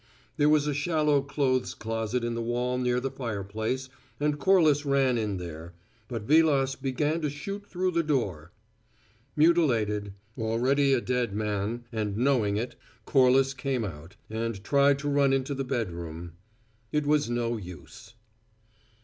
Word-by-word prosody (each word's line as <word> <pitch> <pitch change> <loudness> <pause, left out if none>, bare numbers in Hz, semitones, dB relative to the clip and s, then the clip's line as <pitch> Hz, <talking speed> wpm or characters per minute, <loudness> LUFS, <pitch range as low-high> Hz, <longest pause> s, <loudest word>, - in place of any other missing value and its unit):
There 150 -1 +4
was 150 -1 +4
a 150 - 0
shallow 150 -1 +2
clothes 135 -2 0
closet 115 +2 -2
in 120 0 -1
the 115 - -3
wall 125 +2 -1
near 125 0 +1
the 135 +1 -3
fireplace, 110 +1 -3 0.3
and 150 0 0
Corliss 155 -4 +4
ran 135 -3 +2
in 105 -4 -1
there; 85 -1 -8 0.3
but 115 -2 -5
Vilas 140 -1 +3
began 145 +4 -1
to 150 - 0
shoot 200 +8 -6
through 185 0 -1
the 170 -1 +2
door. 100 - -2 0.8
Mutilated, 115 - +2 0.3
already 130 +5 +2
a 125 - +2
dead 125 -5 -1
man, 105 +2 -2
and 105 -3 -2
knowing 115 -5 +2
it, 120 +3 -3 0.3
Corliss 135 0 +4
came 130 -3 -2
out, 85 +1 -9
and 110 -2 -4
tried 140 +4 +4
to 145 +1 -5
run 140 -1 +3
into 135 +1 0
the 135 0 -2
bedroom. 85 -10 -4 0.6
It 150 -1 0
was 145 -3 +2
no 120 -1 -1
use. 90 +3 -11
125 Hz, 150 wpm, -28 LUFS, 110-145 Hz, 0.8 s, There